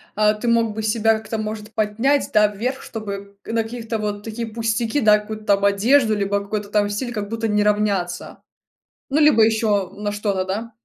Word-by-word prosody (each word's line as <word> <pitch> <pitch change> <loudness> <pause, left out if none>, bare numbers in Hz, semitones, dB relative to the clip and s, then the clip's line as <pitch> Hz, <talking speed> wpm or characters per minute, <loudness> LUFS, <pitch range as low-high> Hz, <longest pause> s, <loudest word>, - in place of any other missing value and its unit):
а, 210 0 +3
ты 235 +3 -5
мог 230 -2 +2
бы 220 - -4
себя 220 0 +2
как-то 220 0 -5
может 215 0 -5
поднять, 225 +8 +1
да, 210 -1 +5
вверх, 240 +6 -3
чтобы 200 -2 -7
на 225 0 0
каких-то 225 0 -5
вот 205 -1 -4
такие 225 +1 -5
пустяки, 225 +3 -1
да, 210 -1 +6
какую-то 215 0 -8
там 200 -1 +3
одежду, 220 +4 +3
либо 200 0 0
какой-то 200 0 -4
там 205 0 +1
стиль, 240 +4 -3
как 210 -2 -3
будто 225 0 -2
не 210 -1 +2
равняться, 200 -4 -1 0.7
ну, 295 - +2
либо 295 -7 +5
ещё 215 -4 +1
на 205 +1 -4
что-то, 205 -2 -1
да. 215 +5 -4
215 Hz, 190 wpm, -21 LUFS, 205-225 Hz, 0.7 s, да